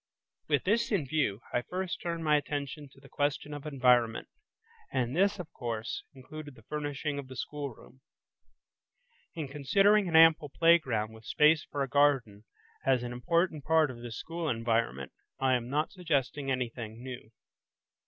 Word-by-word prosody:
With 145 -2 +1
this 230 +6 +1
in 190 -9 +1
view, 135 -8 0
I 120 - +2
first 180 +5 -4
turned 170 -1 -3
my 150 -1 +4
attention 145 0 -3
to - - -19
the 135 - -16
question 145 +1 -2
of 145 +1 -7
environment, 125 -5 +2 0.6
and 130 0 -1
this, 200 +3 +3
of 175 -4 -8
course, 115 -2 -4
included 145 +2 -10
the 115 - -17
furnishing 145 +1 -3
of 140 - -7
the 130 - -10
schoolroom. 135 -2 -7 1.3
In 160 -4 -4
considering 195 +9 +3
an 165 - -1
ample 160 -2 +6
playground 130 -8 +3
with 110 0 -14
space 150 +1 +4
for 140 -1 -2
a - - -2
garden 130 -7 +2 0.4
as 130 -2 +2
an 120 0 -4
important 165 +3 0
part 160 -2 +3
of 125 - -10
this 120 -2 -7
school 165 -1 -4
environment, 115 - -1 0.3
I 130 -1 +3
am 120 -1 -1
not 150 +3 0
suggesting 145 -6 -1
anything 120 -3 -3
new. 125 -4 -8
140 Hz, 160 wpm, -30 LUFS, 125-155 Hz, 1.3 s, ample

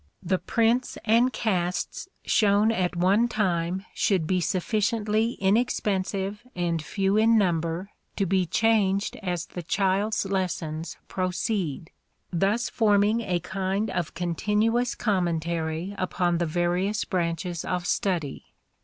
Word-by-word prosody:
The 185 +1 +1
prints 235 +2 +1
and 235 +3 +4
casts 180 - -2 0.2
shown 210 +1 +4
at 185 -5 0
one 195 +7 +3
time 185 -4 -1
should 185 -6 +1
be 185 +2 +1
sufficiently 215 +4 0
inexpensive 200 -1 0
and 170 -2 -1
few 195 +6 0
in 225 +1 +5
number 175 0 0 0.2
to 195 - 0
be 185 -1 +1
changed 200 +1 +2
as 180 -3 -3
the 175 - -7
child's 195 +4 0
lessons 175 -4 -3
proceed, 185 -3 -2 0.4
thus 200 +7 +1
forming 210 0 +3
a 185 -5 -1
kind 195 +3 -2
of 175 -4 -3
continuous 210 +8 0
commentary 170 -2 -1
upon 175 -2 0
the 170 - 0
various 175 +5 0
branches 170 -1 -2
of 180 -1 -2
study. 170 -9 -1
190 Hz, 120 wpm, -26 LUFS, 175-210 Hz, 0.4 s, in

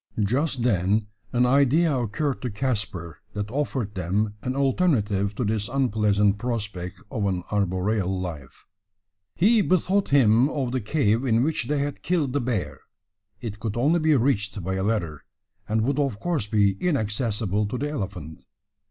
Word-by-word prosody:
Just 130 +4 0
then 105 -1 +1 0.2
an 125 0 +3
idea 140 +4 +3
occurred 125 +4 -1
to 125 - -2
Caspar 105 - -3
that 105 0 -4
offered 130 -6 -2
them 100 +3 -1
an 130 +2 -3
alternative 120 - +1
to 125 - -1
this 105 +1 -1
unpleasant 105 -6 +2
prospect 105 -6 -4
of 110 -7 -1
an 90 -2 -1
arboreal 95 -1 0
life. 80 -8 -7 0.7
He 215 +5 +4
bethought 190 +1 +1
him 125 -1 +5
of 135 -5 -2
the 130 0 -1
cave 115 -1 +1
in 120 -2 +2
which 150 -5 -1
they 150 - 0
had 140 0 -2
killed 160 -8 0
the 145 - +1
bear. 115 -6 -2 0.6
It 105 -3 -6
could 110 -1 -3
only 150 +8 +3
be 155 -1 +3
reached 105 -6 0
by 95 +2 -2
a 95 0 -1
ladder, 90 -9 -1 0.5
and 110 +1 +2
would 140 +4 0
of 135 -8 0
course 165 - -1
be 105 -2 +3
inaccessible 105 - 0
to 125 - -4
the 145 +3 -2
elephant. 90 - -5
110 Hz, 160 wpm, -25 LUFS, 100-140 Hz, 0.7 s, him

